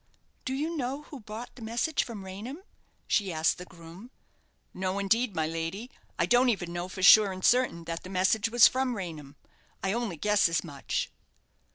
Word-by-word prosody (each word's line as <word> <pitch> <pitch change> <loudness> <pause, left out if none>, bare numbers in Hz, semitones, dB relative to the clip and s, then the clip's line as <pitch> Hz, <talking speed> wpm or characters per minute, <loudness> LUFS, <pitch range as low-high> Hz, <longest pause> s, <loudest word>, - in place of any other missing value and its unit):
"Do 260 - -2
you 315 +5 -2
know 275 0 -3
who 285 - -10
brought 220 +2 -9
the 250 - -13
message 235 +8 0
from 210 -5 -8
Raynham?" 225 - -8 0.4
she 200 -3 +1
asked 160 +2 +1
the 180 - -7
groom. 170 +6 -13 0.6
"No, 185 +1 -2
indeed, 210 +2 +1
my 160 -1 +1
lady. 165 +9 -4 0.3
I - - +2
don't 245 +1 +4
even 175 -6 -2
know 175 +1 -3
for 185 0 -6
sure 205 +1 +8
and 185 0 -4
certain 245 -9 +3
that 165 0 -5
the 185 - -10
message 195 +4 +1
was 235 -2 +7
from 255 -1 -1
Raynham. 155 -8 -7 0.5
I 195 0 0
only 230 -7 -2
guess 210 +1 +3
as 165 - 0
much." 145 -5 -4
200 Hz, 185 wpm, -28 LUFS, 175-240 Hz, 0.6 s, sure